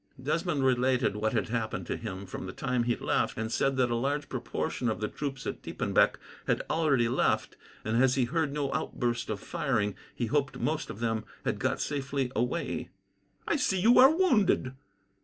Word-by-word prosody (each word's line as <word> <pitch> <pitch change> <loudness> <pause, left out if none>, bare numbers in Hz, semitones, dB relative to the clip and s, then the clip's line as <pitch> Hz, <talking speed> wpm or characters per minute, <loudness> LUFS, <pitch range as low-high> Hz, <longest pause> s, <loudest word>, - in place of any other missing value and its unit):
Desmond 150 +1 0
related 125 -3 +2
what 110 +2 0
had 110 -4 0
happened 110 -6 -2
to - - -2
him 100 -3 -6
from 95 0 -6
the - - -5
time 125 -2 -1
he 120 -1 +2
left, - - 0
and 110 +1 -3
said 135 +1 +1
that 125 -2 +2
a - - +1
large 140 +4 -1
proportion 120 - -2
of 110 - -2
the 105 - -1
troops 135 0 -5
at - - -4
Diepenbeck - - +2 0.3
had - - +1
already 140 -7 +3
left, 125 - +1 0.3
and, 115 +4 +3
as 130 -1 +4
he 130 -3 +2
heard 155 +3 0
no 145 -1 -2
outburst 120 -2 -2
of 105 -2 -2
firing, 130 - -1 0.2
he 120 - -1
hoped 140 +3 0
most 155 +1 -1
of 105 - -7
them 115 -2 0 0.2
had - - -1
got - - 0
safely 140 -2 -2
away. 125 +9 -1 0.6
"I 335 - +2
see 190 -9 +1
you 230 +7 +6
are 260 +1 +10
wounded." 235 - +2
130 Hz, 190 wpm, -29 LUFS, 115-145 Hz, 0.6 s, are